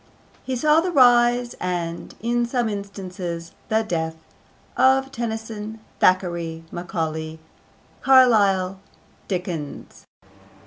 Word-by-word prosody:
He 260 - -3
saw 300 +5 +4
the 365 - -1
rise, 245 -3 +4
and, 170 -2 -4
in 240 +1 +1
some 240 -1 0
instances, 185 -4 -6 0.2
the 220 0 +2
death, 160 -5 -2 0.6
of 265 +1 +3
Tennyson, 220 -2 -5 0.2
Thackeray, 170 -3 +1
Macaulay, 160 -3 -4 0.6
Carlyle, 200 -8 +4 0.5
Dickens. 175 -6 -5
200 Hz, 90 wpm, -23 LUFS, 175-240 Hz, 0.6 s, saw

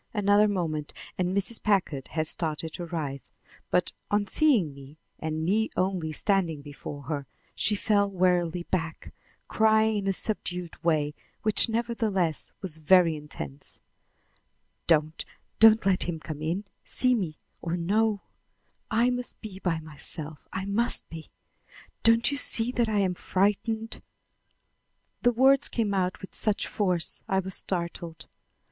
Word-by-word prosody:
Another 205 0 +4
moment 160 -7 -2 0.2
and 180 -1 0
Mrs. 210 +3 +1
Packard 185 -10 0
had 155 -1 -2
started 160 0 -3
to 175 -2 -6
rise; 145 -5 -5 0.4
but, - - +1 0.2
on 205 0 +1
seeing 220 - +2
me 140 +2 -13 0.2
and 160 0 -3
me 215 +5 +1
only 185 -4 0
standing 165 -3 0
before 145 0 -8
her, 140 0 -4 0.3
she 210 - +2
fell 200 0 +2
wearily 180 -2 +1
back, 165 -3 -4 0.3
crying 220 0 +3
in 200 -1 -3
a 195 - +2
subdued 180 -5 -3
way, 150 -3 +1 0.3
which 215 +1 +3
nevertheless 220 -8 -1
was 170 -5 +7
very 170 0 +5
intense: 75 - -5 1.1
"Don't, 155 -1 +2 0.4
don't 220 -1 +7
let 190 -2 +2
him 165 -2 -3
come 155 -1 -7
in 170 +6 -2 0.2
see 255 0 +2
me 180 -10 -2 0.2
or 170 +1 -2
know. 205 +4 +1 0.7
I 235 +2 +2
must 245 0 -4
be 200 -4 -9
by 175 -4 -1
myself; 155 0 -4
I 190 0 -4
must 215 +4 +2
be! 160 -1 -9 0.7
Don't 230 +3 +4
you 280 - -1
see 235 -3 +4
that 240 -3 0
I 215 - 0
am 190 -2 +2
frightened?" 210 +5 -1 1.2
The 245 - +4
words 265 +3 +4
came 220 -4 -1
out 185 -1 -1
with 190 - -10
such 215 -1 +2
force 180 -5 0
I 190 - +2
was 190 0 -2
startled. 170 -3 -2
185 Hz, 140 wpm, -27 LUFS, 160-215 Hz, 1.2 s, was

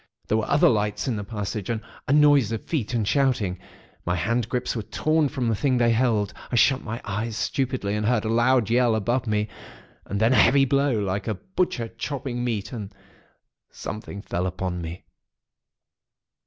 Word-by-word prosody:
There 110 - +2
were 110 - -3
other 145 - +5
lights 105 -1 0
in 125 - 0
the 105 - -3
passage, 105 -1 -4
and 115 -2 0 0.3
a - - 0
noise 145 -6 +5
of 115 - -4
feet 125 -7 -2
and 110 -4 0
shouting. 115 -9 +1 0.4
My 90 - 0
hand 115 +6 0
grips 125 0 -1
were 115 - -2
torn 155 +7 +1
from 130 -5 -2
the 115 - +2
thing 125 +5 +1
they 120 -1 +3
held; 115 -4 +1 0.2
I - - 0
shut 130 +3 +4
my 115 +1 -5
eyes 110 +2 -3
stupidly, 130 -6 -1
and 105 0 0
heard 115 -2 +1
a - - -1
loud 120 -1 +3
yell 120 -2 +3
above 120 +4 0
me; 105 0 0 0.6
and 100 - -2
then 115 +3 +4
a - - +4
heavy 135 +3 +5
blow, 140 -2 +2
like 100 -1 -2
a 110 - 0
butcher 175 - -2
chopping 120 +2 -4
meat; 110 -5 -2
and 105 -5 -6 0.8
something 105 -1 -7
fell 90 -2 -2
upon 90 -1 -3
me. 85 +2 -7
115 Hz, 185 wpm, -25 LUFS, 105-130 Hz, 0.8 s, other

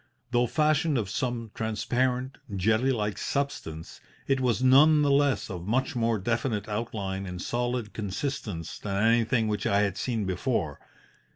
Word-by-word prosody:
Though 120 0 +3
fashioned 150 +3 +2
of 100 -5 -2
some 120 -3 -2
transparent, 125 +4 -1 0.2
jelly 110 +7 +2
like 105 -5 -2
substance, 110 - -3 0.2
it 135 -1 +1
was 125 -1 +1
none 150 +4 +6
the 145 - +3
less 140 -6 +2
of 90 -1 -6
much 130 +4 0
more 115 -1 +1
definite 110 0 -1
outline 100 -3 -3
and 90 0 -6
solid 120 +1 -2
consistence 105 - -4
than 100 0 -1
anything 115 0 +3
which 105 -1 -1
I 100 +1 +3
had 100 -3 0
seen 115 -5 -1
before. 90 - -1
115 Hz, 150 wpm, -27 LUFS, 100-130 Hz, 0.2 s, none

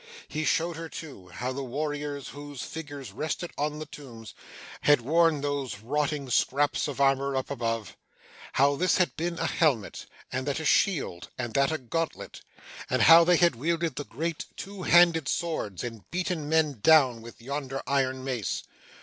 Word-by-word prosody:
He 155 +1 -3
showed 165 +2 +1
her 165 0 -6
too, 140 - -9
how 125 +8 -4
the 140 +1 -4
warriors, 145 +1 -4
whose 145 -2 -8
figures 145 -4 -7
rested 160 +3 -3
on 150 +1 -2
the 155 - -5
tombs, 115 - -11 0.5
had 145 -4 +5
worn 160 +3 +3
those 140 -5 -2
rotting 145 +3 -1
scraps 145 +5 +2
of 140 -2 -5
armour 135 0 +2
up 130 +1 -2
above 115 -5 -3 0.6
how 140 +1 +4
this 185 +3 +2
had 185 - +1
been 170 +1 -2
a 165 - -1
helmet, 140 - 0 0.2
and 130 +2 -3
that 140 +2 -1
a 160 - -5
shield, 145 - +1
and 120 -3 -4
that 140 +3 +3
a 160 - 0
gauntlet 160 +5 -4 0.5
and - - +2
how 165 +1 +9
they 175 +1 +4
had 170 -5 +4
wielded 165 +4 -1
the 145 - -3
great 160 +5 -4
two 200 0 -7
handed 170 -4 +5
swords, 155 - -2
and 115 -3 -7
beaten 175 -4 -2
men 155 -6 +2
down, 135 -7 +5
with 115 +1 -12
yonder 135 +2 -4
iron 130 -2 0
mace. 125 -6 -2
145 Hz, 170 wpm, -28 LUFS, 130-160 Hz, 0.6 s, how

